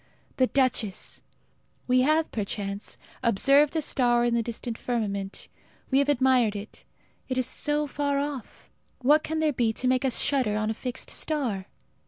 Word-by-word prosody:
The 255 - +4
duchess! 250 -8 0 0.6
We 255 0 +3
have, 310 +4 +2
perchance, 200 -1 -4 0.2
observed 275 +7 +4
a 315 - +1
star 240 -3 +2
in 240 - +1
the 235 - +2
distant 235 +1 -4
firmament. 200 -5 -3 0.4
We 265 - +4
have 280 +1 +1
admired 255 -5 +3
it. 205 +1 -8 0.5
It 255 - -1
is 255 - +2
so 295 +4 0
far 285 -1 -1
off. 280 -3 -5 0.3
What 295 +4 +5
can 315 0 -2
there 310 -2 +2
be 235 -3 +1
to 255 - -2
make 255 +1 +2
us 260 -3 +2
shudder 255 -7 +2
in 215 +1 0
a - - -1
fixed 250 +2 -5
star? 240 -12 -2
255 Hz, 165 wpm, -26 LUFS, 225-280 Hz, 0.6 s, What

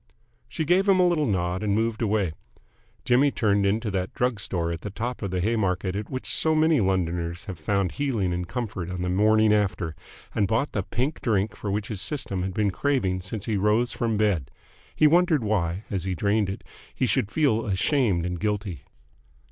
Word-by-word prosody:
She 125 +6 -2
gave 190 +5 +3
him 190 -1 +5
a 180 - +5
little 160 -4 +1
nod, 90 -2 -1
and 105 -2 +1
moved 115 +1 0
away. 105 -6 +1 0.7
Jimmy 130 +4 +4
turned 100 -6 +1
into 105 +2 0
that 95 -1 -3
drug 125 -3 0
store 85 -4 -2
at 85 - -5
the 105 - -5
top 115 +5 -4
of 100 - -2
the 90 0 -1
Haymarket 95 -3 0
at 105 +1 -4
which 130 -1 -5
so 160 0 +2
many 155 -1 +4
Londoners 85 -2 -1
have 95 -6 -7
found 95 +2 0
healing 115 -11 -1
and 90 0 -3
comfort 110 -8 -4
on 90 -1 -4
the 90 - -1
morning 110 +2 +4
after, 95 -6 0 0.4
and 100 - +1
bought 115 +7 0
the 100 - -1
pink 130 - -2
drink 105 -4 0
for 105 - -5
which 100 +1 -2
his 105 -4 -3
system 100 -10 -3
had 95 0 -3
been 105 -2 +1
craving 95 -6 0
since 100 +3 -5
he 110 -3 0
rose 105 +5 +2
from 115 -2 -1
bed. 100 -11 +1 0.5
He 155 - +4
wondered 165 -3 +4
why, 95 -3 -1
as 95 -3 -2
he 95 -1 -1
drained 100 +2 +1
it, 95 - -5 0.3
he - - +1
should 120 -4 +1
feel 115 -6 +1
ashamed 100 - +1
and 90 -1 -3
guilty. 100 -3 -2
105 Hz, 200 wpm, -25 LUFS, 95-120 Hz, 0.7 s, him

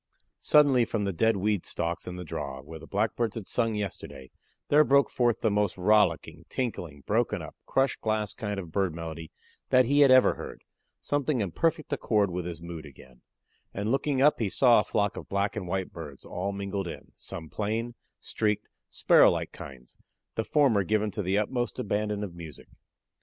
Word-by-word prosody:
Suddenly 140 -5 +5
from 110 -2 -2
the 100 -1 -1
dead 110 +5 +2
weed 100 -1 0
stalks 85 0 -3
in 90 - -5
the 90 - -6
draw, 70 -4 -5
where 80 +2 -10
the 80 - -12
Blackbirds 110 +2 -1
had 110 -4 -6
sung 115 -2 0
yesterday, 100 -9 -6 0.4
there 150 +1 +6
broke 140 -1 +3
forth 120 -2 +1
the 110 - +2
most 105 -3 0
rollicking, 90 -5 +2
tinkling, 90 - -4
broken 105 - 0
up, 80 -3 -9
crushed 135 0 +1
glass 110 -2 -1
kind 105 -2 -4
of 85 -4 -8
bird 95 -2 0
melody 80 -1 -7 0.4
that 130 0 +5
he 140 +4 +2
had 140 -2 +7
ever 130 0 +6
heard - - -9 0.4
something 145 -2 -1
in 100 -5 -1
perfect 160 - 0
accord 105 -7 +1
with 90 0 -3
his 85 -1 -7
mood 85 -2 -7
again; 65 -3 -15 0.5
and 100 +3 -1
looking 135 0 +1
up 150 - +4
he 110 -4 0
saw 120 +2 +5
a - - +1
flock 100 -1 0
of - - -8
black 100 +1 -1
and 100 -4 -4
white 95 +1 -3
birds 75 -5 -9
all 95 +3 -3
mingled 100 -1 -4
in, 85 - -9
some 80 - -8
plain, 110 +7 -3 0.3
streaked, 105 -1 -2 0.2
sparrow - - +5
like - - -2
kinds 65 -3 -12 0.3
the 110 - -1
former 130 -7 +3
given 105 +2 0
to 105 - -3
the 95 +1 0
utmost 120 +3 -1
abandon 105 0 -2
of 95 -4 -6
music. 85 -3 -11
105 Hz, 190 wpm, -28 LUFS, 85-115 Hz, 0.5 s, had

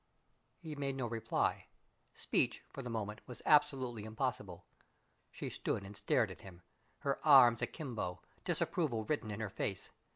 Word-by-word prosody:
He 160 -3 -7
made 140 -2 -2
no 130 -2 -2
reply. 115 -1 -1 0.5
Speech, - - +1
for 135 - -5
the 125 - -6
moment, 110 -1 -3
was 125 - -8
absolutely 130 -6 +3
impossible. 110 -5 -3 0.6
She - - -6
stood 100 - -2
and 100 +1 -9
stared - - +2
at - - -11
him, 90 -2 -12 0.4
her 140 -1 -1
arms 130 -6 +8
akimbo, 115 - -4 0.2
disapproval 125 -10 0
written 145 -6 -1
in 105 +1 -4
her 110 - -2
face. - - -3
120 Hz, 150 wpm, -35 LUFS, 105-135 Hz, 0.6 s, arms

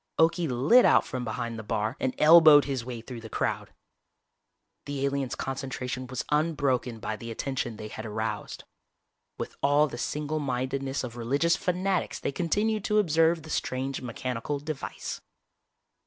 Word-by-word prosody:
Okie 165 +1 +3
lit 135 - +5
out - - +5
from 130 -1 -4
behind 115 0 -4
the - - -6
bar 110 +2 -1
and 130 -1 -1
elbowed 155 -2 +8
his 135 -4 -2
way 120 -1 -6
through 120 0 -8
the 110 - -9
crowd. - - -2 1.1
The 140 -1 -2
aliens' 140 -2 -1
concentration 130 -1 -4
was 130 -1 -4
unbroken 140 -6 +1
by 110 0 -3
the 115 - -8
attention 120 -1 -3
they 105 - -6
had 110 +1 -7
aroused. 110 +1 -4 0.7
With - - -5
all 145 +2 +4
the 120 -5 -6
single 150 +4 -2
mindedness 135 0 -2
of 120 -1 -6
religious 140 +8 +2
fanatics 185 +1 -1
they - - -2
continued 205 +7 0
to 210 - +2
observe 165 -4 +3
the 155 - -9
strange 130 0 -2
mechanical 125 +2 -3
device. 150 0 -5
135 Hz, 155 wpm, -28 LUFS, 120-155 Hz, 1.1 s, elbowed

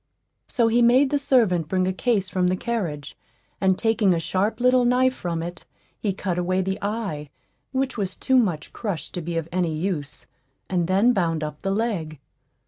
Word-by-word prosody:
So 235 -3 +2
he 235 +2 +3
made 255 +4 +5
the 290 - +2
servant 215 - +2
bring 185 +2 +1
a 185 - 0
case 205 -1 0
from 185 -1 0
the 180 - +2
carriage, 180 -11 -3 0.5
and 190 -1 +3
taking 225 -5 +2
a - - 0
sharp 200 +7 -1
little 250 0 +4
knife 255 +1 +3
from 170 -7 -3
it, 175 0 -7 0.4
he 205 - 0
cut 185 -2 -2
away 185 +1 0
the 190 +2 -2
eye, 200 -9 -3 0.4
which 265 -3 -1
was 190 -2 -2
too 260 -1 +2
much 175 -10 -1
crushed 200 -8 -4
to 175 - -3
be 170 +1 -3
of 165 -1 -2
any 175 -3 0
use, 155 -5 -4 0.4
and 175 -3 0
then 200 +7 +4
bound 165 -6 0
up 150 -1 -6
the 195 - -2
leg. 195 -7 -1
190 Hz, 190 wpm, -24 LUFS, 170-230 Hz, 0.5 s, made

